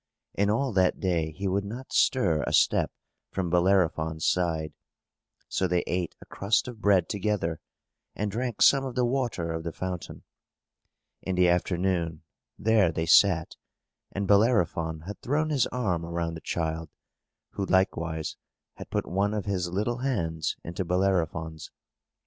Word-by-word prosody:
And 100 0 +1
all 125 +3 +1
that 95 -2 +2
day 85 -4 0
he 95 +6 -4
would 100 +2 0
not 120 +6 -8
stir 85 - +3
a - - -1
step - - +3 0.4
from 90 -3 -3
Bellerophon's 85 -3 +2
side; 80 -4 0 0.7
so 95 - 0
they 90 0 +1
ate 90 -2 -2
a - - -13
crust 100 +5 0
of 120 -3 -8
bread 100 -4 +4
together, 100 -6 -1 0.6
and 105 0 -2
drank 120 +1 0
some 135 -1 +6
of 130 -2 -5
the 125 -1 +2
water 120 -10 -1
of 80 - -3
the 85 - -3
fountain. 90 +1 -6 1.0
In 95 - -2
the 90 0 +4
afternoon, 85 -2 0 0.3
there 105 -5 +3
they 80 0 -2
sat, 85 -1 +4 0.5
and 100 0 -3
Bellerophon 90 -7 +2
had 100 +6 -8
thrown 155 +4 0
his 140 -5 +2
arm 95 -10 -1
around 85 0 -3
the 80 - -8
child, 80 -1 -3 0.6
who 100 - -3
likewise 85 -4 0 0.4
had - - -9
put - - -1
one 100 +3 0
of 105 - -3
his 95 -3 -1
little 105 +7 -1
hands 80 - -1
into 85 +3 -4
Bellerophon's. 85 -4 -1
90 Hz, 150 wpm, -27 LUFS, 85-105 Hz, 1.0 s, some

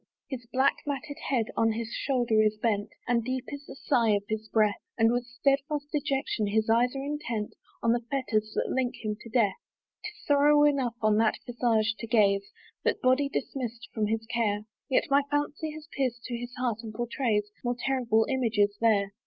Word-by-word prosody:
His 245 -3 -5
black 265 +1 +3
matted 285 0 -4
head 240 -5 +1
on 225 -1 +3
his 230 +1 -4
shoulder 240 -5 +2
is 215 0 +2
bent, 210 -2 0 0.2
And 240 -2 +2
deep 255 +1 -2
is 285 0 -8
the - - -9
sigh 235 -6 +2
of 200 - -1
his 220 0 -3
breath, 215 -2 +2 0.2
And 225 0 +4
with 245 0 -1
stedfast 280 +4 0
dejection 275 -7 -1
his 220 +2 +1
eyes 245 +3 +3
are 270 - -3
intent 240 -8 -3 0.3
On 230 - +4
the 240 0 +2
fetters 215 -6 0
that - - 0
link 255 -2 0
him 210 0 -1
to 230 - -10
death. 220 -4 +2 0.5
'Tis 425 -1 -9
sorrow 295 +1 +5
enough 270 -5 +2
on 215 -1 +4
that 220 -1 +3
visage 230 -2 +1
to 230 - -5
gaze. 200 -4 +3 0.3
That - - +1
body 260 +2 +3
dismiss'd 240 -4 -4
from 215 -2 0
his 225 +1 -1
care; 220 -3 -1 0.2
Yet 265 - +3
my 280 +1 +6
fancy 295 +2 -1
has 310 0 -10
pierced 245 -4 -1
to 245 - -4
his 245 +1 -6
heart, 245 -3 -1
and 220 -2 -8
pourtrays 230 -3 -1
More 245 0 0
terrible 240 -4 +2
images 220 -6 +1
there. 205 -3 +3
235 Hz, 190 wpm, -28 LUFS, 220-270 Hz, 0.5 s, my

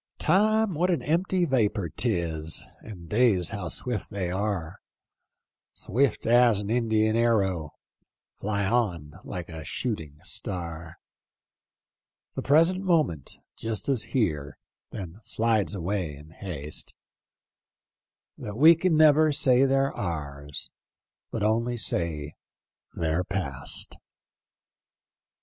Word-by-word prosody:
" - - -64
Time, 215 0 +3
what 175 +4 +1
an 175 - 0
empty 175 +3 +1
vapor 110 - +1
'tis. 85 -7 -1 0.2
And 90 -6 -10
days 105 -3 +3
how 100 -5 -4
swi£t 115 +3 -3
they 95 -3 -3
are: 95 -4 -2 1.0
Swift 130 +2 0
as 120 -2 +5
an 105 +1 -3
Indian 110 -2 +2
arrow 95 -9 +1 0.3
— - - -49
Fly 100 -1 -1
on 90 -8 -1
lilie 90 -3 -5
a 80 -1 -7
shooting 80 - -4
star. 85 -3 -5 1.4
The - - -4
present 165 +7 +4
moment 155 - 0 0.2
just 110 +3 -3
is 130 -5 +2
here, 75 - -1 0.3
Then 95 -1 -8
slides 110 -2 0
away 90 -4 -2
in 75 +3 -14
haste, 80 -5 -5 1.4
That 105 +1 -6
we 160 +5 +8
can 165 -1 +1
never 155 0 +6
say 130 -2 +4
they're 135 0 +2
ours. 70 -5 -5 0.6
But 110 - -3
only 115 +3 +1
say 80 -7 -1 0.6
they're 80 +2 0
past." 80 -9 -2
105 Hz, 115 wpm, -27 LUFS, 85-125 Hz, 1.4 s, we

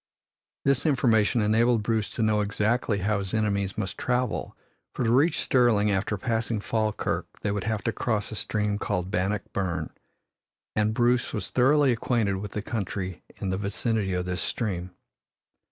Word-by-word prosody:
This 140 +2 +2
information 120 -5 +3
enabled 115 +2 +3
Bruce 110 0 0
to 115 - 0
know 110 -1 +3
exactly 105 +2 0
how 105 -1 +2
his 100 +2 -3
enemies 100 -3 0
must 95 - -3
travel, 125 -2 -1 0.4
for - - -1
to 115 - +2
reach 150 +6 +3
Stirling 115 -5 +3
after 100 +2 0
passing 115 -2 -1
Falkirk 110 0 -1
they 105 - 0
would 100 +1 -2
have 110 -2 -1
to 115 - +1
cross 110 -3 -1
a - - -5
stream 105 -1 -1
called 90 -3 -2
Bannock 95 +3 0
Burn, 85 -5 -2 0.8
and 105 +1 +1
Bruce 120 0 +2
was 105 -4 -3
thoroughly 135 +2 +4
acquainted 115 -4 0
with 100 +2 -6
the 105 - -3
country 95 -5 -4
in 95 - -3
the 95 - -1
vicinity 100 0 -1
of 90 0 -1
this 90 -2 -2
stream. 90 -6 -2
105 Hz, 165 wpm, -27 LUFS, 100-120 Hz, 0.8 s, thoroughly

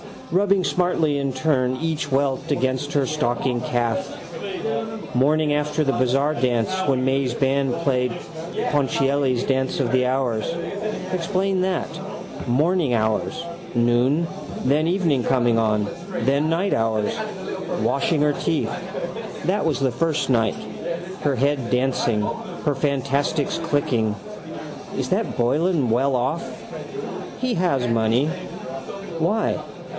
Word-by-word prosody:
Rubbing 195 +1 +3
smartly 170 -5 +2
in 140 -1 -1
turn 130 -2 +1
each 160 -3 -1
welt 135 0 +1
against 130 +2 0
her 140 -2 +3
stockinged 125 -4 0
calf. 120 -2 0 1.1
Morning 150 +4 +3
after 150 +1 +1
the 135 - +2
bazaar 135 +4 +2
dance 120 0 +1 0.2
when 130 -2 +2
May's 130 -1 +1
band 135 0 +1
played 125 -3 +2 0.6
Ponchielli's 135 -2 +2
dance 130 0 0
of 120 - 0
the 130 0 +3
hours. 125 -4 0 0.7
Explain 185 +1 +1
that: 185 -1 0 0.6
morning 150 +3 +2
hours, 110 +7 0 0.3
noon, 120 +7 +3 0.4
then 150 +5 +3
evening 170 -8 +2
coming 120 -3 +3
on, 105 -2 +2 0.3
then 140 +5 +2
night 175 +5 +1
hours. 110 -2 +1 0.7
Washing 145 +2 +2
her 150 0 +3
teeth. 160 +2 0 0.7
That 195 +3 +1
was 155 -3 +1
the 135 -2 +3
first 145 +2 0
night. 115 -4 +3 0.7
Her 145 -2 +2
head 135 -1 +1
dancing. 125 -3 +2
Her 150 - -2
fansticks 140 +2 0
clicking. 145 -9 +1 0.8
Is - - -1
that - - 0
Boylan 145 +3 +2
well 130 +3 +3
off? 130 +7 0 1.0
He 255 -1 0
has 170 -9 +2
money. 115 +4 +3 0.9
Why? 210 +7 +1
135 Hz, 120 wpm, -23 LUFS, 125-155 Hz, 1.1 s, Rubbing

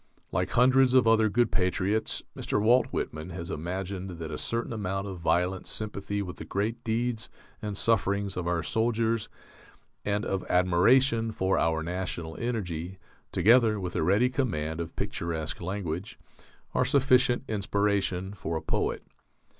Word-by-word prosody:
Like - - 0
hundreds 130 +1 +4
of 125 -3 +5
other 110 -1 +5
good 120 +3 +2
patriots, 95 +3 0
Mr. - - -1
Walt 120 +5 +4
Whitman 75 +3 -4
has 85 -2 -6
imagined 90 +2 -4
that 80 -1 -6
a 75 - -4
certain 115 +1 -2
amount 95 -2 -2
of 95 -3 -6
violent 90 +3 0
sympathy 100 -1 -3
with 90 -2 -7
the - - -6
great 115 +4 -2
deeds 115 0 -1 0.3
and 105 -2 -4
sufferings 100 -3 +1
of 90 -1 -3
our 85 -2 0
soldiers, 115 0 0 0.7
and 105 +1 -1
of 95 -1 -1
admiration 115 +7 +4
for 95 -3 +1
our 80 -1 +1
national 85 -2 -4
energy, 95 -7 -3 0.3
together 110 +3 +4
with 90 -2 -5
a - - +1
ready 100 +10 +3
command 85 - -1
of 85 - -7
picturesque 80 -3 -3
language, 90 0 -4 0.6
are - - +3
sufficient 130 -3 +3
inspiration 100 -2 0
for 85 -4 -3
a - - -4
poet.... - - -1
100 Hz, 145 wpm, -28 LUFS, 90-115 Hz, 0.7 s, of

